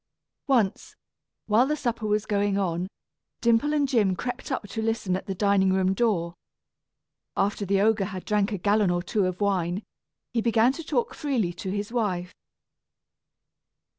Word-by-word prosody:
Once, 230 -8 +1 0.5
while 225 +5 +4
the 300 - +1
supper 235 -6 -2
was 210 0 +1
going 205 -1 +1
on, 180 -2 -1 0.5
Dimple 235 +5 +3
and 295 -2 +2
Jim 210 -8 +2
crept 245 +8 -5
up 255 -5 -2
to 225 - -3
listen 220 -4 0
at 190 - -5
the 195 - -3
dining 200 -1 +3
room 190 0 +2
door. 190 -6 0 1.0
After 200 0 0
the 195 +1 +2
ogre 215 -1 +3
had 190 -2 -6
drank 210 0 +1
a 205 - -1
gallon 205 +1 +2
or 175 0 0
two 195 0 +1
of 185 0 -4
wine, 190 -1 0 0.5
he 230 - +1
began 230 +1 +4
to 330 - -7
talk 265 -6 -1
freely 240 -12 -1
to 185 +2 -6
his 205 +2 -3
wife. 185 -7 -1
205 Hz, 165 wpm, -26 LUFS, 190-230 Hz, 1.0 s, while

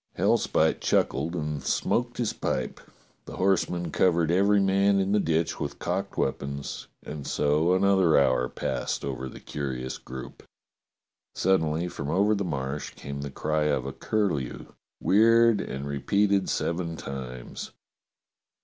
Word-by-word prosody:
Hellspite - - +2
chuckled 85 +2 +1
and 75 -3 -3
smoked 120 - 0
his 120 -3 0
pipe, - - -2 0.5
the - - -8
horsemen 90 -3 +1
covered 85 -2 +3
every 100 +3 +4
man 100 +1 +3
in 95 0 0
the 105 - +4
ditch 80 -2 0
with - - -4
cocked - - -3
weapons, 70 +1 -3 0.2
and 75 -2 -7
so 75 +5 +2
another 95 -3 +4
hour 65 -2 +3
passed - - -3
over 65 0 -4
the - - -11
curious 65 -3 -4
group. 65 +1 -9 0.9
Suddenly 85 -3 +1
from 70 -4 -5
over 100 +6 +3
the 100 -1 0
Marsh 70 -4 -4
came 70 0 -6
the 70 - -4
cry 75 +2 -1
of 70 -4 0
a 70 - -4
curlew, 90 - -2 0.3
weird 115 +1 +5
and 70 +1 -5
repeated 100 +8 +1
seven 85 -1 -1
times. 65 -3 -7
80 Hz, 135 wpm, -27 LUFS, 70-95 Hz, 0.9 s, weird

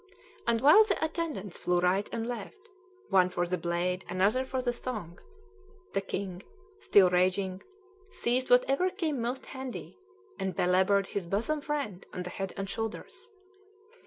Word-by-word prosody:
And 230 -1 +2
while 305 +10 +8
the 425 -2 0
attendants 315 - -4
flew 180 0 +1
right 185 +3 +1
and 230 0 -3
left, 240 - -5 0.5
one 185 -2 +5
for 175 -1 -1
the 180 +1 -1
blade, 175 +2 -1
another 200 +8 +2
for 260 0 -2
the 245 -1 0
thong, 215 -9 -6 0.7
the 195 - +1
king, 190 -2 -4 0.4
still 190 - +5
raging, 185 +1 +1 0.5
seized 255 -4 0
whatever 270 +8 +4
came 325 - -2
most 245 +3 -3
handy, 265 +5 -7 0.4
and 190 -2 -2
belabored 190 +3 +3
his 195 -4 -3
bosom 235 - 0
friend 285 - -3
on 180 - -4
the 180 - -6
head 195 +1 -4
and 195 0 -3
shoulders. 225 - -5
200 Hz, 150 wpm, -30 LUFS, 185-255 Hz, 0.7 s, while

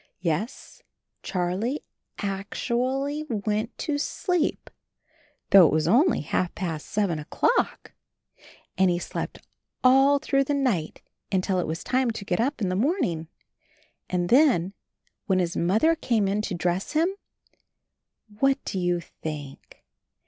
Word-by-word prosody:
Yes, 180 - -3 0.4
Charlie 190 +9 -2 0.4
ac 195 0 -2
tu 240 - -3
ally 275 +3 -1
went 215 +1 -2
to 290 -2 -2
sleep 360 +2 -1 0.8
though 190 -4 +9
it - - 0
was 155 0 +1
only 255 - +4
half 175 +4 -1
past 165 -5 -4
seven 200 -7 0
o'clock! 455 - 0 0.9
And 190 -1 +5
he 175 - +1
slept 175 - -5 0.4
all 270 +2 +6
through 275 -1 +1
the 290 - 0
night 230 - -1 0.3
until 185 -1 +1
it 180 - -1
was 160 +2 -4
time 255 -1 +1
to 220 -3 -5
get 180 - -1
up 255 -2 -1
in 190 - +1
the 185 - -1
morning. 195 - 0 0.8
And 175 -1 -1
then 240 - +4 0.3
— - - -45
when 190 -3 +2
his 175 -2 0
Mother 220 - +3
came 230 -10 +1
in 200 +2 0
to 185 - -3
dress 175 +2 -1
him, 320 +3 +3 1.3
what 275 0 +3
do 190 - -3
you 175 -1 0
think? 150 -4 -9
200 Hz, 140 wpm, -26 LUFS, 175-270 Hz, 1.3 s, though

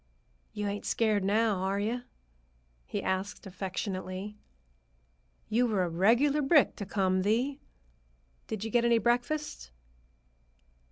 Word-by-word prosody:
"You 210 -1 -4
ain't 205 0 -3
scared 215 -3 +2
now, 210 +1 +2
are 190 +2 -1
you?" 230 +4 -1 0.9
he - - -3
asked 190 +3 -2
affectionately. 190 +1 -4 1.1
"You 235 +3 +2
were 205 -5 +1
a 175 - -1
regular 240 - +3
brick 285 +1 +4
to 200 - -5
come, 185 -2 +1
Thee. 245 +8 +1 0.9
Did 215 -2 -4
you 225 - -4
get 240 +1 +3
any 235 -1 +4
breakfast?" 245 - -1
210 Hz, 120 wpm, -30 LUFS, 190-235 Hz, 1.1 s, brick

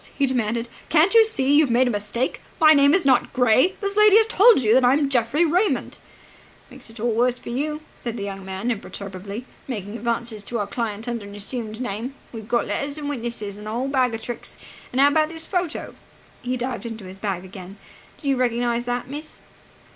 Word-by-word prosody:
he 280 - +3
demanded. 235 -2 -1 0.2
"Can't 335 +5 +4
you 455 -1 +8
see 285 -11 +1
you've 295 -2 +5
made 245 +2 +3
a - - +1
mistake? 210 +4 -2 0.2
My 310 -1 +8
name 285 0 +5
is 385 - +1
not 260 -2 +3
Gray. 255 - +3
This 400 0 -2
lady 425 -1 +6
has 445 - +5
told 440 - +5
you 215 0 +4
that 260 +1 +5
I 245 +1 +5
am 280 -1 +1
Geoffrey 255 +6 +2
Raymond!" 360 +6 0 0.7
"Makes - - -12
it 225 +1 -13
all 235 +2 0
the 225 - -1
worse 250 0 +2
for - - -10
you," 300 +5 -2 0.2
said 235 -1 -5
the 200 - -4
young 195 -1 -6
man 190 +5 -3
imperturbably, 200 +1 -6 0.2
"making 210 -4 -5
advances 235 -1 -3
to 240 - -3
our 205 - -1
client 220 0 -4
under 235 -3 -4
an 200 - -10
assumed 215 +1 -6
name. 245 +2 -4 0.2
We've 220 -2 -8
got 235 0 +1
letters 280 +1 -2
and 295 -1 -4
witnesses 230 -6 -4
and 210 - -9
the - - -4
whole 250 +4 -2
bag 255 -4 +1
of 225 - -8
tricks. 240 - -6 0.3
And 255 - -2
how 280 +1 +7
about 310 +1 +2
this 325 0 -7
photo?" 355 -3 -3 0.5
He 250 +1 -2
dived 245 -1 -4
into 225 -2 -7
the 185 0 -9
bag 195 -3 -3
again. 190 +1 -10 0.4
"Do 290 - -7
you 270 -1 +2
recognize 240 -1 0
that, 245 0 -2
miss?" 295 +3 -8
245 Hz, 215 wpm, -23 LUFS, 220-285 Hz, 0.7 s, you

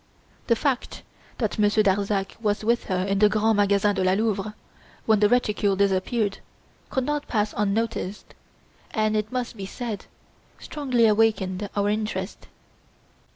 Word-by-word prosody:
The 235 - +4
fact 265 +1 -2 0.3
that 220 -3 -2
Monsieur 210 +1 +4
Darzac 195 0 0
was 210 -1 0
with 235 +2 +1
her 185 -1 -1
in 195 0 0
the 210 0 +6
Grands 215 +1 +2
Magasins 205 0 +3
de 190 - -1
la 185 0 +3
Louvre 210 0 -1 0.5
when 220 -2 +4
the 210 0 +4
reticule 210 -4 +2
disappeared 200 +2 0 0.5
could 265 -1 -1
not 295 0 -2
pass 210 -2 0
unnoticed, 210 -1 -2 0.6
and, 215 -1 0
it 215 0 -1
must 250 -2 -3
be 195 -3 -6
said, 230 0 -5 0.5
strongly 255 -6 0
awakened 210 -3 +2
our 200 0 +1
interest. 210 -2 -3
210 Hz, 145 wpm, -25 LUFS, 200-225 Hz, 0.6 s, the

